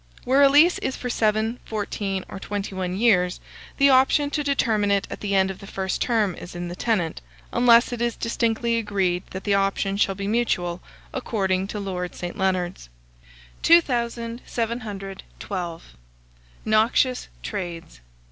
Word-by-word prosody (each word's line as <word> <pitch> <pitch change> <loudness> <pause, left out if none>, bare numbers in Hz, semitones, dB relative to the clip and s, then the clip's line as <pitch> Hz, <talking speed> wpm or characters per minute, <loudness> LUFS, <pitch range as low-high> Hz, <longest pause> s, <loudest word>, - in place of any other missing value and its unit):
Where 265 +3 +3
a 280 - +8
lease 305 +5 +5
is 265 - -2
for 250 - -3
seven, 220 +2 +1
fourteen, 200 -3 -3
or 195 - -8
twenty 200 0 -4
one 185 -1 -3
years, 185 -5 +3 0.4
the 280 0 +5
option 270 +2 +4
to 295 - -1
determine 225 -7 +1
it 200 -1 +2
at - - -6
the 200 -1 -1
end 190 0 +3
of 190 - -10
the 195 - -11
first 190 -1 -3
term 220 -6 +1
is 175 - -10
in 175 0 -4
the 175 - -6
tenant, 180 -7 -1 0.3
unless 240 0 +5
it 235 - -4
is 235 -1 0
distinctly 230 0 0
agreed 195 -5 0
that 190 0 -7
the 205 - +1
option 195 0 +1
shall 195 -1 +2
be 195 +1 -4
mutual, 180 -6 0 0.3
according 195 -6 -1
to 210 - -5
Lord 180 -3 -4
St. 175 0 -5
Leonards. 185 - -1 0.7
2712. 230 - -1 0.8
NOXIOUS 225 +4 +2 0.2
TRADES. 170 - -6
205 Hz, 150 wpm, -24 LUFS, 190-235 Hz, 0.8 s, a